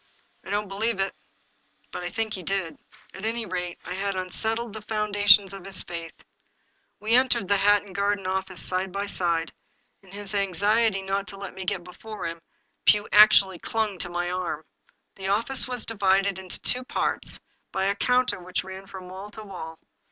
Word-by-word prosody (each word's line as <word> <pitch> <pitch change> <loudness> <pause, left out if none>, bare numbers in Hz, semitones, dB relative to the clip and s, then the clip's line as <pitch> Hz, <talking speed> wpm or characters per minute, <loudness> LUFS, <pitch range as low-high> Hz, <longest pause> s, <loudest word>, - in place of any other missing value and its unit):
" - - -40
I - - -10
don't 205 +1 0
believe 205 +2 0
it." 195 0 0 0.8
But - - -5
I 175 - -2
think 225 +1 -2
he 185 - -4
did; 185 -2 -2 0.3
at 195 - -9
any 225 +1 -1
rate, 180 -2 -3
I 180 - -4
had 195 +1 -1
unsettled 220 +5 -2
the 220 - -6
foundations 205 -2 +4
of 195 -2 -8
his 195 0 -2
faith. 170 -1 -7 0.8
We 220 +2 0
entered 250 -6 +4
the 200 - +4
Hatton 205 0 +3
Garden 200 0 0
office 190 -1 -2
side 185 +1 -1
by 200 +1 -2
side; 170 -4 0 0.5
in 190 -2 -18
his 200 0 -7
anxiety 200 +2 +2
not 195 +1 -1
to 195 - -8
let 200 -1 -7
me 190 - -6
get 185 -1 -1
before 215 +5 -8
him, 165 0 -4 0.4
Pugh 210 0 +5
actually 195 -3 +7
clung 215 -4 -1
to 175 - -2
my 175 0 -2
arm. 180 -1 -3 0.5
The 190 -1 -4
office 230 +8 +2
was 250 -2 -2
divided 195 -2 +2
into 185 -1 -5
two 250 +1 +1
parts 255 - 0 0.3
by 190 - 0
a 200 +1 +2
counter 250 0 +2
which 180 0 -3
ran 190 +1 -9
from 185 -2 -9
wall 190 +3 -8
to 215 +1 -9
wall. 170 -5 -8
195 Hz, 185 wpm, -26 LUFS, 185-210 Hz, 0.8 s, actually